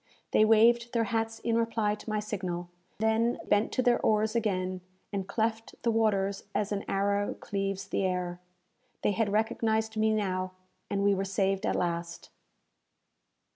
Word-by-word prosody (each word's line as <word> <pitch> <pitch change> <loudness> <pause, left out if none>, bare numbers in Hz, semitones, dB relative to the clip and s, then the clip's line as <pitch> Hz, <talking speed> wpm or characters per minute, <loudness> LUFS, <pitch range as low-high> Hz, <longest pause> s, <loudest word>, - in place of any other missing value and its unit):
They 215 - +5
waved 235 +2 +4
their 230 -1 +2
hats 225 0 -1
in 230 -1 0
reply 225 -2 +1
to 210 - -8
my 215 0 0
signal; 185 -4 -4 0.3
then 220 +2 +1
bent 205 +1 +2
to 255 - +1
their 245 -1 +4
oars 215 +1 +2
again, 185 -5 -1 0.3
and 195 -2 -2
cleft 225 0 -1
the 235 - +3
waters 200 -3 +1
as 210 -1 0
an 205 -1 -1
arrow 200 +1 0
cleaves 195 -1 -3
the - - -1
air. 180 -1 -2 0.6
They - - +3
had 210 0 0
recognized 220 +1 0
me 220 0 +3
now, 185 -3 -1 0.4
and 200 0 0
we 200 0 +4
were 195 0 0
saved 195 +1 0
at - - +1
last! 170 -1 -3
210 Hz, 160 wpm, -29 LUFS, 195-225 Hz, 0.6 s, They